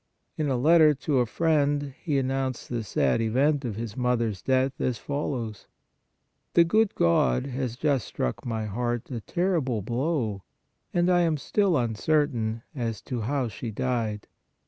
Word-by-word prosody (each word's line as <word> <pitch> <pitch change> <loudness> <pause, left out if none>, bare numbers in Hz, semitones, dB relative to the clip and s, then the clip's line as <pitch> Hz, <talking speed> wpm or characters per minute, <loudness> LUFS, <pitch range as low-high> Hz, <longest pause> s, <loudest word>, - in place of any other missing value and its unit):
In 150 -2 -1
a 130 - +1
letter 155 +2 +6
to 135 0 0
a 120 - +2
friend 145 -1 +1
he 150 -5 0
announced 130 -1 -2
the 120 -2 -2
sad 110 +2 +1
event 135 +6 +2
of 115 -5 -3
his 110 -1 -5
mother 125 -2 +1
s 95 -3 -7
death 130 0 +2
as 125 -3 0
follows: 125 -7 -4 0.4
" 65 +1 -49
The 170 - +8
good 215 +5 +2
God 85 - +2
has 130 -3 -3
just 135 -2 0
struck 60 - -3
my 110 -2 -2
heart 120 +4 -3
a 120 -3 -4
terrible 145 - 0
blow... 120 - -1 0.5
and 175 0 +2
I 180 -1 +4
am 165 -3 +2
still 190 +3 +1
uncertain 115 -1 0
(as 115 -6 -3
to 125 -3 -4
how 130 +3 0
she 115 +2 -6
died). 110 -2 -2
125 Hz, 165 wpm, -26 LUFS, 115-145 Hz, 0.5 s, The